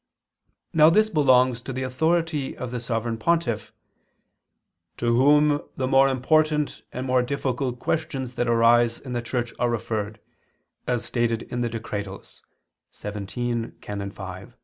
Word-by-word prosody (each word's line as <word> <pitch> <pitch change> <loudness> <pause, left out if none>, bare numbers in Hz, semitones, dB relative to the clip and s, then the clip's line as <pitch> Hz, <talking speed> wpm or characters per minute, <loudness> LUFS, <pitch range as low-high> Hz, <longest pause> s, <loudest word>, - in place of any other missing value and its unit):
Now 155 0 +7
this 215 +5 +3
belongs 130 -5 +4
to 135 - -6
the 130 0 -3
authority 160 +2 0
of 125 -2 -5
the 125 - -3
Sovereign 115 -1 -2
Pontiff, 120 -6 0 1.3
"to 120 0 +1
whom 145 +3 +4 0.2
the 130 - 0
more 135 +1 +5
important 150 +3 +1
and 125 +1 -4
more 130 -1 +3
difficult 130 -1 -2
questions 135 -3 -2
that 120 - -1
arise 115 0 +4
in 130 -2 -8
the 120 - -1
Church 120 0 -3
are 120 0 +2
referred," 110 -2 -3 0.7
as 120 -2 0
stated 115 -2 0
in 120 - -4
the 120 - 0
Decretals 105 -4 -6 0.5
[*Dist. 105 0 -7
xvii, 120 -1 -2
Can. 100 -1 -5
5]. 95 -2 -9
125 Hz, 145 wpm, -25 LUFS, 115-135 Hz, 1.3 s, Now